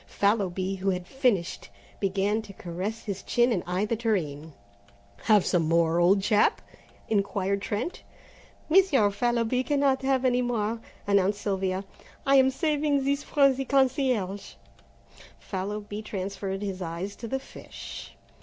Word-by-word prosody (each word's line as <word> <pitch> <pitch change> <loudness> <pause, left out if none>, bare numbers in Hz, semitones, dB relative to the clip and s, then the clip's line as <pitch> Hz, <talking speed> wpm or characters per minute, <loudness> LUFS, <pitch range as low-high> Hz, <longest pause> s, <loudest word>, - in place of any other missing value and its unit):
Fallowby, 195 -2 0
who 195 +1 -1
had 180 -1 -2
finished, 225 - 0 0.3
began 200 +2 0
to 205 -2 -12
caress 185 +6 -5
his 200 -2 -4
chin 240 +1 +2
and 190 -6 +1
eye 180 +3 0
the 230 - -1
tureen. 160 -10 -2 0.7
"Have 210 -4 +5
some 170 -4 +1
more, 165 0 +3
old 190 +3 +4
chap?" 210 0 +3 0.5
inquired 200 -1 0
Trent. 215 - -3 0.7
"Monsieur 310 - +4
Fallowby 240 +3 +1
cannot 275 -2 +2
have 265 -1 +1
any 250 -1 +3
more," 230 -2 -1 0.3
announced 200 0 +2
Sylvia; 190 -1 -1 0.4
"I 275 0 +5
am 265 0 +6
saving 295 -1 +1
this 280 +1 0
for 275 -2 +3
the 270 +1 -3
concierge." 255 -7 0 0.8
Fallowby 205 +2 -5
transferred 195 -1 -4
his 190 -2 -4
eyes 175 +4 -4
to 230 - -6
the 265 - -1
fish. 265 - -10
205 Hz, 135 wpm, -27 LUFS, 190-255 Hz, 0.8 s, am